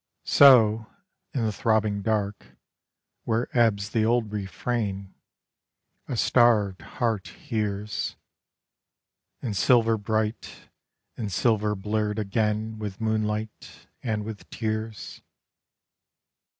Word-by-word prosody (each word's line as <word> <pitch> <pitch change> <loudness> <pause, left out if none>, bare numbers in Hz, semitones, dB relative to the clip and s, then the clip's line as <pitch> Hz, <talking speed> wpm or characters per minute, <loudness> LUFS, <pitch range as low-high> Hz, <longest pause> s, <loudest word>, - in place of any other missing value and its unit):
So, 115 -6 +6 0.4
in 125 -5 -1
the 110 - +1
throbbing 105 -1 +1
dark, 105 -1 -2 0.7
where 115 +3 -1
ebbs 110 -4 +2
the 110 - +1
old 115 -1 +1
refrain, 100 -1 -3 0.9
A 125 - -3
starved 110 -6 +3
heart 115 -5 -2
hears. 105 -2 -3 1.3
And 110 -5 -2
silver 115 +1 +4
bright, 110 +2 -3 0.5
and 105 -3 -4
silver 105 +1 +1
blurred 105 +1 -2
again 110 +1 -1
With 105 -3 -5
moonlight 110 -1 -3
and 110 -3 -2
with 110 -2 -8
tears. 110 -1 -4
110 Hz, 95 wpm, -26 LUFS, 105-115 Hz, 1.3 s, So